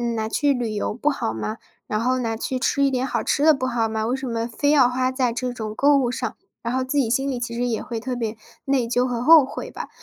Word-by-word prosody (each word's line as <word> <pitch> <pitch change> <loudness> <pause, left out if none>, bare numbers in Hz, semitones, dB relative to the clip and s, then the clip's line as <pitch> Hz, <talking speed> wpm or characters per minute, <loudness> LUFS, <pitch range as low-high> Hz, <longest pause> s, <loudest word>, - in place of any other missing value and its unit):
拿 220 0 -2
去 285 +4 +2
旅 235 -4 -2
游 210 - -2
不 285 +6 0
好 275 - -2
吗？ 215 - -4 0.3
然 215 - -1
后 255 +2 +1
拿 225 -2 -1
去 260 +2 -2
吃 280 +2 +1
一 275 - +4
点 255 0 0
好 - - -1
吃 285 - +1
的 315 0 +7
不 255 -2 -2
好 230 -3 0
吗？ 220 0 -2
为 250 - 0
什 265 -1 -5
么 230 -1 -2
非 265 +5 -1
要 270 -5 +6
花 255 +1 0
在 255 -2 0
这 250 +1 -2
种 220 -3 -5
购 285 +3 +4
物 255 -3 +1
上？ 250 - -3 0.3
然 235 +1 -2
后 260 - 0
自 260 +3 -2
己 235 -4 +1
心 270 +3 +1
里 255 - -2
其 235 -1 -4
实 245 +1 -1
也 230 -3 -1
会 230 -2 -5
特 250 +2 -4
别 225 -2 -3 0.3
内 265 -4 +1
疚 245 +1 +1
和 240 -1 -2
后 315 +1 +8
悔 - - -7
吧。 - - -7
250 Hz, 300 characters per minute, -23 LUFS, 230-265 Hz, 0.3 s, 后